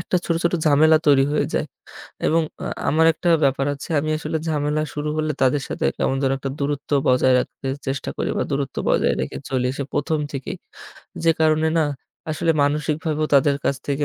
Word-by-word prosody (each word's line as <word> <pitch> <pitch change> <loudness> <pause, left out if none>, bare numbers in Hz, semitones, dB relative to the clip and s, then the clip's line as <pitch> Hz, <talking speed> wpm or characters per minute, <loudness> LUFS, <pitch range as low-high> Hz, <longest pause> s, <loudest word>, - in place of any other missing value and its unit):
একটা 175 - -1
ছোট, 165 - +1
ছোট, 170 - +2
ঝামেলা 155 +2 +5
তৈরি 140 -2 +5
হয়ে 150 - +1
যায় - - 0 0.6
এবং 165 +1 +3 0.2
আ - - -4 0.2
আমার 160 +2 +4
একটা 175 +2 -3 0.2
ব্যাপার 135 0 +1
আছে, 140 - -9
আমি 155 +2 -2
আসলে 160 - -3
ঝামেলা 150 0 0
শুরু 150 +1 -3
হলে, 155 0 0
তাদের 135 +2 +2
সাথে - - -3
কেমন 135 - 0
যেন 135 -1 +2
একটা 135 0 -4
দূরত্ব 145 0 -3 0.2
বজায় 130 0 +4
রাখতে 130 - -5 0.2
চেষ্টা 135 +2 -3
করি - - -2
বা - - +1
দূরত্ব 140 -1 -2
বজায় - - +2
রেখে 65 - -4
চলে 125 -1 0
সে - - -2
১ম 155 +2 0
থেকেই। 135 -2 -5 0.7
যে 165 - +6
কারণে 155 0 +3
না, 155 - +3 0.5
আসলে 165 +2 0
মানসিকভাবেও 150 +2 0
তাদের 140 +1 +4
কাছ 140 - +1
থেকে 145 +1 0
145 Hz, 190 wpm, -22 LUFS, 135-155 Hz, 0.7 s, যে